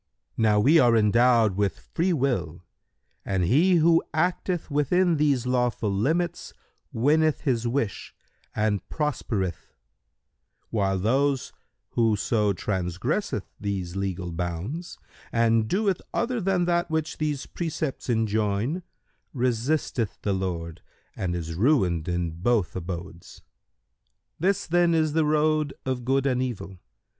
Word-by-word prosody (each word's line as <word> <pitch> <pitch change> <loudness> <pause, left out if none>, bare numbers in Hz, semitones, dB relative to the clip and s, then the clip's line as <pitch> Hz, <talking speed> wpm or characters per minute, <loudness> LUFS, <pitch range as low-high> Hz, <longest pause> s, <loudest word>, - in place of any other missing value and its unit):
Now 105 -2 +3
we 150 +10 +5
are 120 -4 +5
endowed 115 -1 +4
with 100 0 0
Freewill 130 - 0 0.6
and 95 -2 0
he 155 - +4
who 165 0 +4
acteth 175 0 -1
within 165 +4 +2
these 140 -4 +2
lawful 125 -4 0
limits 165 - -1 0.4
winneth 155 +6 +2
his 120 -4 0
wish 120 -4 -2 0.4
and 105 -2 +1
prospereth, 110 - -3 1.0
while 95 -3 +1
whoso 115 -3 0
transgresseth 95 - -2
these 95 -3 -3
legal 95 -2 -3
bounds 90 - -4 0.3
and 115 -1 +2
doeth 195 - 0
other 240 0 0
than 185 -2 +1
that 175 0 +1
which 160 -1 -2
these 150 -2 -1
precepts 155 -6 -4
enjoin, 110 - 0 0.5
resisteth 125 -2 -1
the 100 - +1
Lord 85 -3 -4 0.3
and 90 -2 -2
is 85 -1 -4
ruined 90 - +2
in 85 -1 -1
both 90 +2 0
Abodes. 85 -1 -7 1.0
This 190 +4 +1
then 170 0 +3
is 155 -2 +1
the 160 -1 +2
road 155 -1 +1
of 130 -2 -2
Good 135 +1 +1
and 130 -2 +1
Evil. 110 -7 -5
120 Hz, 115 wpm, -26 LUFS, 100-155 Hz, 1.0 s, we